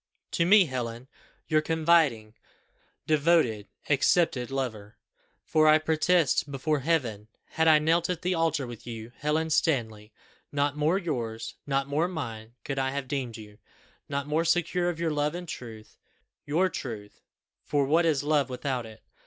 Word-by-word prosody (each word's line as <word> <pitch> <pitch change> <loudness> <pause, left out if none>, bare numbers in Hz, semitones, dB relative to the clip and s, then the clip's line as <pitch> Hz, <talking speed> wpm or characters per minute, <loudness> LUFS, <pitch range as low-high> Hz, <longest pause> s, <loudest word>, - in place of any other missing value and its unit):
To 170 - +1
me, 200 0 +7
Helen, 125 -3 -5 0.4
your 155 -1 +3
confiding 155 -9 +2 0.7
devoted 150 -9 +2 0.2
accepted 140 -3 +2
lover! 110 -6 -4 0.5
for 155 0 +3
I 155 0 +7
protest 155 -1 +1
before 145 +2 -1
Heaven, 125 -9 -1 0.2
had 160 0 +1
I 155 -1 +7
knelt 165 +3 +1
at 180 -1 -3
the 180 +1 +1
altar 165 -4 0
with 120 -1 -10
you, 115 0 -7
Helen 155 +2 0
Stanley, 110 -9 0 0.4
not 145 0 0
more 155 +5 +2
yours, 120 - -4
not 135 -1 0
more 150 +5 +1
mine 120 -9 -6
could 135 -1 -3
I 130 0 0
have 140 -1 -4
deemed 125 -4 -3
you 105 -1 -13 0.5
not 140 0 -2
more 155 +3 0
secure 175 +1 +1
of 170 -2 -5
your 165 -1 0
love 150 +1 -1
and 175 0 -6
truth 110 -7 -9 0.5
your 165 +6 +2
truth, 110 - -7 0.4
for 145 -2 +1
what 160 +5 +3
is 150 -4 +1
love 145 -3 +1
without 125 -2 -3
it! 110 0 -14
145 Hz, 155 wpm, -27 LUFS, 120-160 Hz, 0.7 s, me